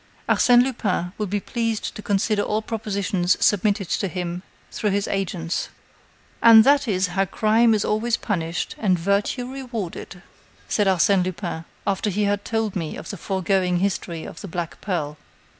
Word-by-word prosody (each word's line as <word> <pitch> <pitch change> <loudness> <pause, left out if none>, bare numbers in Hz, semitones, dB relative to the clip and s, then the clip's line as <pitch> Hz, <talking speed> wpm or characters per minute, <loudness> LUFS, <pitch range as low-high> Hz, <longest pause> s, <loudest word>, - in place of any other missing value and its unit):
"Arsène 245 0 +5
Lupin 205 -8 -2
will 210 - -1
be 205 +2 -1
pleased 230 0 -2
to - - -7
consider 205 +1 +1
all 215 +1 -1
propositions 200 -5 0
submitted 205 -1 +2
to 195 - -1
him 180 -1 -4 0.3
through 210 - -1
his 200 0 0
agents." 180 -3 -2 0.7
"And 225 -1 +9
that 280 +1 +4
is 190 -3 +1
how 195 +2 +1
crime 220 +4 +3
is 210 - 0
always 225 +2 +1
punished 170 -5 -2
and 190 -5 +2
virtue 200 +7 0
rewarded," 235 -8 -6 0.4
said 205 -2 +1
Arsène 190 +1 +3
Lupin, 175 -2 -4 0.2
after 200 +1 0
he 205 +2 0
had 200 0 0
told 225 -3 -2
me 165 -5 -3
the - - -7
foregoing 190 -1 0
history 175 -3 -2
of 155 - -9
the - - -7
black 170 -1 -5
pearl. 155 -6 -3
200 Hz, 160 wpm, -23 LUFS, 180-215 Hz, 0.7 s, And